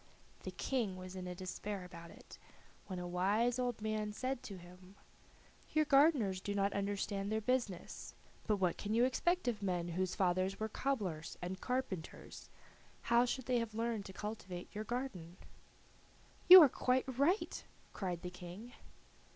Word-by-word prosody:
The - - -5
King 225 -8 -1
was 185 0 -8
in 180 -1 -5
despair 190 +2 -5
about 170 -2 -10
it, - - -14 0.5
when 185 - -5
a 180 0 -4
wise 210 +8 +1
old 245 -3 -2
man 215 -1 -1
said 255 +3 -2
to 195 - -8
him: 180 +2 -14 0.8
"Your 310 0 +4
gardeners 275 - +4
do 200 +1 -3
not 200 0 +1
understand 200 0 -2
their 220 - +1
business: 220 -6 -2 0.3
but 215 - +3
what 185 -4 0
can 210 +1 -1
you 240 +2 +5
expect 345 +5 +1
of 225 -4 -1
men 175 -3 -1
whose 185 +1 -1
fathers 185 +1 +1
were 220 0 -2
cobblers 200 - -2
and 185 +2 -5
carpenters? 250 -10 -4 0.6
How 240 +1 +6
should 260 +1 -3
they 250 -2 +2
have 225 -2 -4
learned 225 -2 -1
to - - -8
cultivate 190 -4 -6
your 215 +1 -4
garden?" 200 -9 -4 1.1
"You 365 -1 +14
are - - +8
quite 255 0 +1
right," 280 - +1 0.3
cried 180 -4 -3
the 180 - -4
King. 180 +6 -9
205 Hz, 160 wpm, -36 LUFS, 185-245 Hz, 1.1 s, You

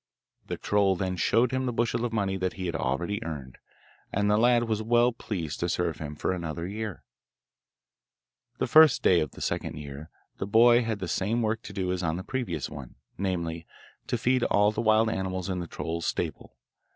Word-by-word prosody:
The - - -3
troll 100 -2 +2
then 95 0 -2
showed 115 +6 +2
him 130 0 -1
the - - 0
bushel 115 0 0
of 120 - -2
money 100 -3 0
that 95 -1 -1
he 95 - -5
had 85 - -2
already 85 +11 -1
earned, 70 -6 -7 0.5
and 105 +1 +1
the - - +4
lad 120 +1 +4
was 110 -2 -1
well 120 +2 +3
pleased 90 - -5
to 85 - -1
serve 85 -3 -1
him 75 -1 -6
for - - -1
another 85 -2 -4
year. 105 0 -5 1.5
The - - 0
first 155 0 +6
day 90 - +5
of 75 - -2
the - - -11
second - - -2
year 75 +1 -8 0.3
the 95 - -2
boy 120 +3 +6
had 115 -2 -2
the 95 -3 -5
same 105 +7 0
work 110 +1 0
to - - -9
do 95 -2 -2
as 90 0 -2
on 80 -1 -1
the 95 - -5
previous 100 - -3
one 65 -4 -9 0.2
namely, 85 -4 -2 0.4
to 120 - 0
feed 125 +2 +2
all 105 +1 +3
the - - -2
wild 110 0 +4
animals 95 -3 -2
in 90 -1 -1
the 85 - -5
troll's 85 +1 -4
stable. - - -4
95 Hz, 200 wpm, -27 LUFS, 85-115 Hz, 1.5 s, first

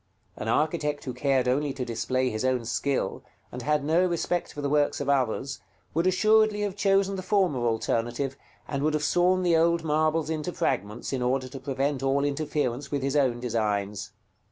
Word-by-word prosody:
An - - -6
architect 150 +3 0
who 130 - -4
cared 130 0 +1
only 140 +2 +1
to 130 - -4
display 125 +3 -1
his 110 +1 -3
own 130 -2 +1
skill, 135 +4 -1 0.3
and 125 - -6
had 150 +3 +1
no 165 +4 +3
respect 175 0 -1
for - - -9
the 145 - -1
works 145 0 +2
of 140 - -3
others, 135 0 0 0.3
would 165 +3 +1
assuredly 215 +2 +3
have 205 -2 -2
chosen 195 -1 +2
the - - -3
former 185 - +1
alternative, 120 +4 -1 0.3
and 140 -1 -2
would 155 +1 +1
have 150 - -1
sawn 180 +4 +3
the 175 -2 +3
old 170 +1 +3
marbles 155 0 +1
into 160 +3 -2
fragments 105 +7 -2
in 130 - -1
order 130 +1 0
to 135 +1 -8
prevent 135 +1 -1
all 135 +1 +1
interference 140 -2 -2
with 140 -2 -2
his 135 +1 -1
own 130 -5 +2
designs. 105 -4 -2
140 Hz, 185 wpm, -27 LUFS, 125-160 Hz, 0.3 s, no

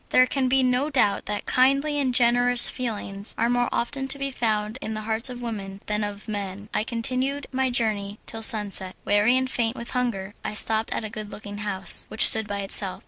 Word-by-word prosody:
There 255 - +5
can 260 0 -1
be 265 0 +3
no 255 +3 +1
doubt 250 -8 +1
that 210 0 -4
kindly 275 +3 +2
and 265 -3 0
generous 245 0 +4
feelings 205 -5 -5
are 230 +1 +1
more 245 0 +1
often 270 +3 -2
to 270 - +3
be 275 0 -3
found 220 -1 -2
in 220 - -5
the 215 - -4
hearts 225 +3 -1
of 245 -1 -8
women 200 -4 -6
than 210 0 -2
of 205 +1 -6
men. 205 -1 -6
I - - 0
continued 255 +5 -2
my 265 0 0
journey 215 -4 -1
till 225 - -7
sunset. 205 -5 +3
Weary 210 +5 +3
and 260 0 0
faint 235 -2 -1
with 235 - -7
hunger 215 -6 -2
I - - -5
stopped 220 +1 +1
at - - -2
a - - -5
good 215 -2 -7
looking 205 -1 -9
house, 200 -2 +3
which - - +5
stood 220 -1 +4
by 200 -1 -4
itself. 195 -1 +1
225 Hz, 210 wpm, -24 LUFS, 205-255 Hz, -, There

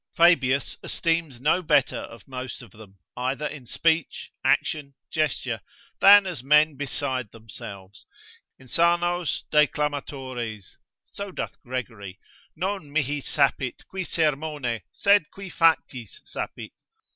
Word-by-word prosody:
Fabius 140 -6 +4
esteems 165 -6 -1
no 155 +7 +2
better 150 -5 +2
of 115 -3 -10
most 130 -1 -6
of 115 - -15
them, 105 -2 -15 0.2
either 130 +4 -2
in 145 -4 -6
speech, 160 +3 0
action, 140 -3 +1 0.2
gesture, 135 -8 -1 0.4
than 200 0 +9
as 170 -10 -4
men 150 +2 +5
beside 130 -3 -3
themselves, 100 -3 -11 0.5
insanos 170 +2 +1
declamatores; 135 - -1 0.3
so 200 -1 -7
doth - - -5
Gregory, 115 -7 -6 0.4
Non 185 -3 -3
mihi 145 -1 0
sapit 135 -2 0
qui 190 0 -4
sermone, 150 -7 -1
sed 200 -5 +3
qui 195 -2 -9
factis 150 - +1
sapit. - - -6
145 Hz, 110 wpm, -25 LUFS, 125-165 Hz, 0.5 s, than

